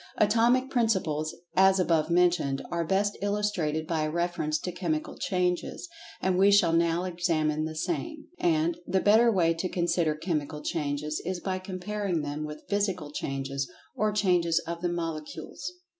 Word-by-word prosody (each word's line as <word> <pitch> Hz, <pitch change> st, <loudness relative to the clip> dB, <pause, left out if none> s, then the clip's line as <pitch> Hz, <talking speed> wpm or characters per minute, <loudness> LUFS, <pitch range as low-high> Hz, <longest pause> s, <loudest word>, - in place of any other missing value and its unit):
Atomic 235 Hz, +5 st, +3 dB
Principles, 170 Hz, -, 0 dB, 0.2 s
as 190 Hz, 0 st, +5 dB
above 165 Hz, -3 st, +2 dB
mentioned, 170 Hz, -6 st, +2 dB
are 170 Hz, -1 st, 0 dB
best 195 Hz, +4 st, +1 dB
illustrated 200 Hz, -7 st, 0 dB
by 160 Hz, -1 st, -1 dB
a 155 Hz, -, 0 dB
reference 170 Hz, -2 st, -1 dB
to 180 Hz, -, -4 dB
Chemical 165 Hz, -4 st, -2 dB
changes, 180 Hz, -, -1 dB, 0.3 s
and 185 Hz, -1 st, +1 dB
we 195 Hz, +1 st, +6 dB
shall 180 Hz, -5 st, +5 dB
now 170 Hz, +1 st, +2 dB
examine 160 Hz, -4 st, 0 dB
the 160 Hz, 0 st, -5 dB
same. 315 Hz, -, -3 dB
And, 165 Hz, 0 st, +1 dB
the 190 Hz, -, +2 dB
better 220 Hz, +4 st, +5 dB
way 170 Hz, -5 st, +3 dB
to 165 Hz, +3 st, -3 dB
consider 170 Hz, -3 st, +1 dB
Chemical 150 Hz, -2 st, -3 dB
Changes 150 Hz, 0 st, -2 dB
is 180 Hz, +1 st, -3 dB
by 185 Hz, +1 st, -2 dB
comparing 185 Hz, -2 st, -3 dB
them 145 Hz, +1 st, -3 dB
with 150 Hz, 0 st, -8 dB
Physical 190 Hz, -7 st, -1 dB
Changes, 135 Hz, -1 st, -3 dB, 0.2 s
or 215 Hz, +1 st, +1 dB
Changes 180 Hz, -5 st, +2 dB
of 170 Hz, 0 st, -5 dB
the 175 Hz, -, 0 dB
Molecules. 165 Hz, +2 st, -5 dB
175 Hz, 155 wpm, -28 LUFS, 155-190 Hz, 0.3 s, we